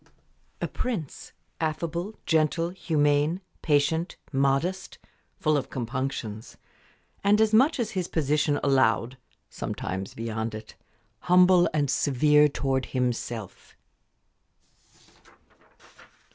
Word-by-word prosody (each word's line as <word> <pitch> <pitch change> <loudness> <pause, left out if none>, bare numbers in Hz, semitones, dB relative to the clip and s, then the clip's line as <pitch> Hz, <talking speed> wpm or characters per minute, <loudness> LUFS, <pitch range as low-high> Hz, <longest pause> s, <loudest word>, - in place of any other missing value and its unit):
"A - - 0
prince, 210 - -5 0.3
affable, 170 +5 -3
gentle, 165 +1 +1
humane, 150 -2 +1 0.2
patient, 160 +3 +1 0.2
modest, 140 +8 0 0.4
full 155 -1 +1
of 140 - -2
compunctions, 120 -3 -4 0.7
and, 205 +1 +4
as 220 0 +3
much 270 +7 +4
as 235 - -1
his 185 -2 -2
position 150 -1 +1
allowed 130 -2 +2 0.3
sometimes 95 +1 -5
beyond 110 0 -4
it 110 0 -9 0.5
humble, 180 +1 +5
and 150 -2 +1
severe 150 +3 +4
towards 135 -2 -1
himself." 120 -5 -4
150 Hz, 90 wpm, -26 LUFS, 130-170 Hz, 0.7 s, humble